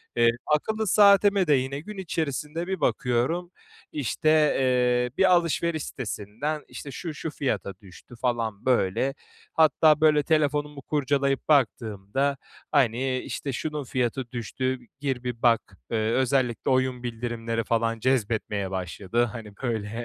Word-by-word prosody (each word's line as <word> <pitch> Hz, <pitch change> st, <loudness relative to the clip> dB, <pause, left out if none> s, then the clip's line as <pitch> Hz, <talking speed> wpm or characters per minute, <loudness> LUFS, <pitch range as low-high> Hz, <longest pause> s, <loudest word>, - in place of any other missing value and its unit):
Eee, 120 Hz, 0 st, +5 dB, 0.3 s
akıllı 220 Hz, +6 st, -2 dB
saatime 200 Hz, -1 st, +5 dB
de 150 Hz, -, +5 dB
yine 135 Hz, +1 st, 0 dB
gün 210 Hz, +6 st, -9 dB
içerisinde 160 Hz, -1 st, -3 dB
bir 190 Hz, -3 st, -2 dB
bakıyorum, 135 Hz, +11 st, 0 dB, 0.4 s
işte, 150 Hz, +2 st, -1 dB, 0.3 s
eee, 125 Hz, -1 st, +2 dB
bir 190 Hz, -1 st, +5 dB
alışveriş 170 Hz, -2 st, +1 dB
sitesinden, 125 Hz, +6 st, -4 dB
işte, 140 Hz, -, -8 dB
şu 160 Hz, +4 st, -5 dB
şu 160 Hz, -, -5 dB
fiyata 110 Hz, -10 st, -2 dB
düştü 95 Hz, +5 st, -14 dB
falan 115 Hz, -4 st, -1 dB
böyle. 130 Hz, +2 st, +2 dB, 0.4 s
Hatta 155 Hz, -1 st, +4 dB
böyle 150 Hz, -2 st, +5 dB
telefonumu 150 Hz, -2 st, 0 dB
kurcalayıp 140 Hz, -1 st, 0 dB
baktığımda, 125 Hz, 0 st, +1 dB, 0.3 s
hani, 130 Hz, -1 st, +2 dB
işte, 140 Hz, +1 st, -5 dB
şunun 150 Hz, +2 st, -3 dB
fiyatı 125 Hz, 0 st, -2 dB
düştü, 130 Hz, +2 st, -2 dB, 0.2 s
gir 135 Hz, -3 st, -2 dB
bir 120 Hz, -2 st, -4 dB
bak. 115 Hz, -6 st, +2 dB
Eee, 115 Hz, -, +1 dB
özellikle 130 Hz, -1 st, +1 dB
oyun 130 Hz, -1 st, +1 dB
bildirimleri 115 Hz, -1 st, -3 dB
falan 115 Hz, 0 st, 0 dB
cezbetmeye 110 Hz, -5 st, 0 dB
başladı. 95 Hz, +5 st, -1 dB
Hani, 110 Hz, -3 st, -8 dB
böyle, 110 Hz, -4 st, -2 dB
130 Hz, 130 wpm, -26 LUFS, 115-150 Hz, 0.4 s, Eee